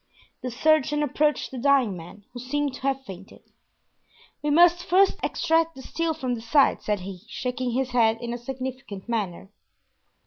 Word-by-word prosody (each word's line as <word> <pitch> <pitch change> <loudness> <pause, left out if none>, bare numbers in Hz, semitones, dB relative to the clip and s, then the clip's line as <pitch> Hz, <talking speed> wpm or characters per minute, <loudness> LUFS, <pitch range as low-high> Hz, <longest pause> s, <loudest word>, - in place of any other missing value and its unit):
The 255 - -3
surgeon 295 +3 +2
approached 295 +1 0
the 260 - -6
dying 260 -6 +3
man, 180 +4 -11
who 245 - -7
seemed 285 +2 -2
to 270 - -9
have 270 0 -1
fainted. 195 -2 -11 1.0
"We 295 - -1
must 345 +3 +5
first 385 +3 +3
extract 330 -1 +1
the 265 - -10
steel 330 +2 -2
from 255 -5 -2
the 230 - -4
side," 270 +5 +3
said 210 -2 -1
he, 185 -1 -8
shaking 250 -1 -3
his 260 0 -1
head 225 -2 +3
in 240 0 -4
a 240 - -5
significant 255 -5 -6
manner. 200 -4 -3
260 Hz, 170 wpm, -25 LUFS, 230-295 Hz, 1.0 s, must